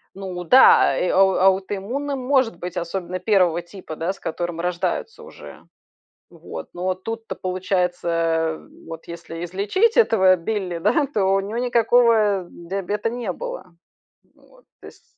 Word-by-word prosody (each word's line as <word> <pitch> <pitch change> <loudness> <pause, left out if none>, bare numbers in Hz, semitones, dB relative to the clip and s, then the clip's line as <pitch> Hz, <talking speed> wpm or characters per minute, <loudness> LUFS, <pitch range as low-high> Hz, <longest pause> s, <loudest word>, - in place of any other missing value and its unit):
Ну 185 -2 -6
да, 255 +10 +6
э, 180 - 0
ау 190 0 +4
аутоиммунным 200 +9 0
может 255 -6 +1
быть, 180 +1 -7
особенно 180 +1 -4
1 180 -4 +2
типа, 175 -2 -10
да, 170 +4 -2
с - - -17
которым 170 0 -4
рождаются 180 - -3
уже. - - -13 0.7
Вот. - - -9
Но 185 +1 -2
тут-то 225 +4 -6
получается, 175 -3 -1 0.3
вот 165 0 -9
если 170 0 -7
излечить 205 - 0
этого 190 - +5
Билли, 180 -1 -3
да, 240 - +2
то 215 -8 -1
у 195 - +2
него 205 +4 -5
никакого 230 -5 +3
диабета 195 +5 -4
не 240 -5 -4
было. 180 0 -8 0.6
Вот. - - -24 0.2
То - - -11
есть - - -16
190 Hz, 140 wpm, -22 LUFS, 175-225 Hz, 0.7 s, да